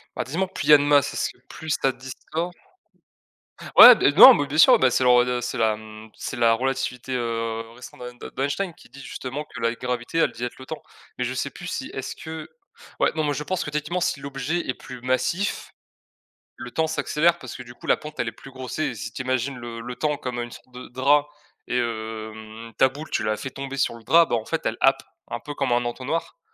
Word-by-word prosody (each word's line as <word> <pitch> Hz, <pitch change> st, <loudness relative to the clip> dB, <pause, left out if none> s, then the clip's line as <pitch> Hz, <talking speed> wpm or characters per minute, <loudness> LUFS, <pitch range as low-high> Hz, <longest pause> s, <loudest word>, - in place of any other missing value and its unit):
Bah, -, -, -1 dB
dis-moi, 170 Hz, +9 st, -2 dB
plus 185 Hz, -5 st, -5 dB
il -, -, +6 dB
y -, -, +11 dB
a -, -, +11 dB
de 145 Hz, -, 0 dB
masse, 145 Hz, -1 st, +3 dB
est -, -, -5 dB
ce -, -, 0 dB
que -, -, -24 dB
plus 160 Hz, -1 st, -6 dB
ça 135 Hz, -, +3 dB
distord 130 Hz, +7 st, -5 dB, 1.3 s
ouais, 245 Hz, -1 st, +12 dB
beh, 145 Hz, -, +3 dB
non, 255 Hz, -, +11 dB
mais 145 Hz, -, 0 dB
bien 145 Hz, +2 st, -4 dB
sûr, 160 Hz, -, +8 dB
bah, 130 Hz, -1 st, +4 dB
c'est 130 Hz, -, +2 dB
la 125 Hz, -, +5 dB
rela 125 Hz, 0 st, +3 dB
c'est, 125 Hz, -, -4 dB
mmh, 110 Hz, 0 st, -2 dB
c'est -, -, -5 dB
la 115 Hz, -1 st, +4 dB
relativité, 130 Hz, 0 st, -2 dB
heu, 115 Hz, -2 st, -2 dB
restreinte 125 Hz, 0 st, -11 dB
de -, -, -8 dB
d'en -, -, -30 dB
d'Einstein 170 Hz, +5 st, -2 dB
qui -, -, -18 dB
dit 135 Hz, +3 st, -14 dB
justement 135 Hz, +3 st, -6 dB
que -, -, -10 dB
la 115 Hz, 0 st, +1 dB
gravité, 125 Hz, +5 st, -3 dB
elle 165 Hz, -, +3 dB
dilate 120 Hz, +1 st, -5 dB
le 130 Hz, -, -11 dB
temps 155 Hz, -, -7 dB, 0.4 s
mais 125 Hz, -, -1 dB
je 125 Hz, -, -2 dB
sais 140 Hz, +2 st, -3 dB
plus 180 Hz, -, -9 dB
si 265 Hz, +8 st, -4 dB
est-ce 135 Hz, -, -5 dB
que 160 Hz, -1 st, -7 dB, 0.5 s
ouais, -, -, +3 dB
non, 155 Hz, -, 0 dB
moi 145 Hz, -, 0 dB
je 150 Hz, +2 st, -4 dB
pense 185 Hz, +4 st, -2 dB
que -, -, -5 dB
techniquement 150 Hz, +4 st, -2 dB
si 150 Hz, -, 0 dB
l'objet 140 Hz, +4 st, -3 dB
est 130 Hz, -, 0 dB
plus 130 Hz, -1 st, -10 dB
massif, 130 Hz, +10 st, -1 dB, 0.9 s
le 120 Hz, -, -8 dB
temps 160 Hz, 0 st, 0 dB
s'accélère 160 Hz, +1 st, +1 dB
parce -, -, -9 dB
que, 125 Hz, -, -7 dB
du 120 Hz, 0 st, -12 dB
coup, -, -, -13 dB
la -, -, +4 dB
pente, 155 Hz, 0 st, -10 dB
elle 120 Hz, -, -1 dB
est 115 Hz, -, -5 dB
plus 135 Hz, -, -13 dB
grossie 130 Hz, +3 st, -5 dB
et 135 Hz, -5 st, -1 dB
si -, -, -6 dB
tu -, -, -5 dB
imagines 130 Hz, +1 st, -1 dB
le 120 Hz, -1 st, -7 dB
le 125 Hz, +2 st, -6 dB
temps 150 Hz, +2 st, -1 dB
comme 125 Hz, -3 st, -4 dB
une 120 Hz, -, -5 dB
sorte 130 Hz, -, -14 dB
de 125 Hz, +1 st, -10 dB
drap 140 Hz, +4 st, +2 dB, 0.4 s
et 125 Hz, -, -1 dB
hem, 110 Hz, -1 st, -5 dB
ta 130 Hz, -, +5 dB
boule, 145 Hz, +4 st, -9 dB
tu -, -, 0 dB
la 110 Hz, 0 st, 0 dB
fais 135 Hz, -, -6 dB
tomber 135 Hz, 0 st, -6 dB
sur 135 Hz, -, 0 dB
le 115 Hz, -, -12 dB
drap, 165 Hz, +8 st, +5 dB
bah, -, -, +2 dB
en 110 Hz, -, -3 dB
fait, 165 Hz, -, -2 dB
elle 110 Hz, -, -1 dB
happe 135 Hz, 0 st, +4 dB, 0.3 s
un 120 Hz, -, -4 dB
peu 145 Hz, +4 st, -8 dB
comme 140 Hz, -3 st, -1 dB
un 120 Hz, 0 st, +2 dB
entonnoir, 135 Hz, -, -3 dB
130 Hz, 245 wpm, -24 LUFS, 120-150 Hz, 1.3 s, ouais